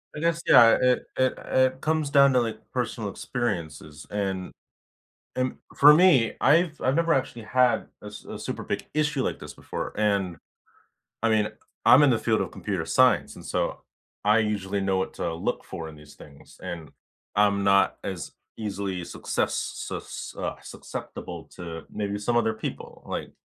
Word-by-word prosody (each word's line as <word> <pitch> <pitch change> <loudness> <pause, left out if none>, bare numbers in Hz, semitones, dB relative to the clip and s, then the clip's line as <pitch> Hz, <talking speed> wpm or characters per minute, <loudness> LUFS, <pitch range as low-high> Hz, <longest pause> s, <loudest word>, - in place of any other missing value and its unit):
I 150 - -5
guess, 170 +1 +1
yeah, 115 -2 +8
it 125 -1 +2
it 130 0 +3
it 130 0 +1
comes 155 -2 0
down 140 -1 +6
to, 125 - +4
like, 115 -2 -3
personal 120 -4 -2
experiences. 85 -10 -4
And 95 -3 -2 0.8
and 130 0 -1 0.2
for 150 +1 +9
me, 155 -10 +5
I've 155 +2 +3
I've 130 +1 +1
never 165 0 +3
actually 130 -3 -2
had 125 +2 +2 0.2
a - - -10
s 105 - -9
a - - -7
super - - -5
big - - -3
issue 150 -2 +1
like - - -2
this - - -9
before, - - -5
and 100 -5 +1 0.9
I 115 - +3
mean 110 -1 +2 0.4
I'm 130 - +8
in 145 - +6
the 120 - +3
field 110 -1 +1
of - - -2
computer 95 -6 -3
science, 130 +10 +3
and, - - -12
so, - - -2 0.4
I 105 +2 +5
usually 100 -2 -1
know 95 -1 +1
what 95 - -2
to 85 - -2
look 95 +8 -2
for 85 -4 -7
in - - -11
these 75 -1 -15
things. 70 -1 -16
And 85 -4 -6 0.5
I'm 100 -1 +3
not 100 0 +4
as 95 -4 -5 0.3
easily 100 -4 -3
success - - -2
sus - - -5
uh, - - -3
susceptible - - -7
to 85 -2 -7
maybe 100 -1 -3
some 110 +4 -1
other 110 -1 +2
people, 110 - -7
like - - -5
110 Hz, 170 wpm, -26 LUFS, 95-130 Hz, 0.9 s, for